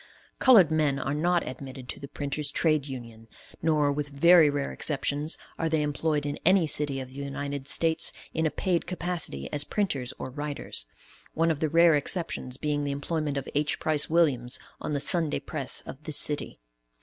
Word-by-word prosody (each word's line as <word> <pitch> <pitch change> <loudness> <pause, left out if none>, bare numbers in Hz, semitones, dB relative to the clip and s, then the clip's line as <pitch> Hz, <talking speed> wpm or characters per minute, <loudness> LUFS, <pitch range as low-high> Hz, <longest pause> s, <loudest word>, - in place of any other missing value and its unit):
Colored 210 - +6
men 150 -3 +2
are 140 - -2
not 170 +3 +1
admitted 130 0 -8
to - - -6
the 140 - -8
printers' 145 +1 -3
trade 155 -3 +1
union, 115 -4 -9 0.3
nor, 150 -3 +2
with 145 0 -2
very 160 +2 +6
rare 145 -1 -2
exceptions 145 +1 0 0.2
are 165 - 0
they 160 -1 +1
employed 150 0 -1
in 145 - -3
any 185 -1 +5
city 145 -2 0
of 130 -1 -7
the 130 - -13
United 140 0 -5
States 160 +2 +3 0.2
in 160 0 +1
a - - +1
paid 175 +1 -1
capacity 170 - -2
as 145 - +3
printers 145 - -2
or 130 - -6
writers; 145 - -4 0.5
one 165 +1 +2
of 155 - -3
the 155 - 0
rare 165 +1 +5
exceptions 145 -3 -1
being 145 0 -1
the 145 - -2
employment 145 +1 -2
of 135 - -4
H. 145 +1 0
Price 155 -2 +2
Williams, 140 -7 +2 0.2
on - - -4
the 145 - 0
Sunday 160 0 +2
Press 145 -6 -3
of 135 - -9
this 155 -2 +2
city. 150 -1 +1
150 Hz, 185 wpm, -27 LUFS, 140-160 Hz, 0.5 s, Colored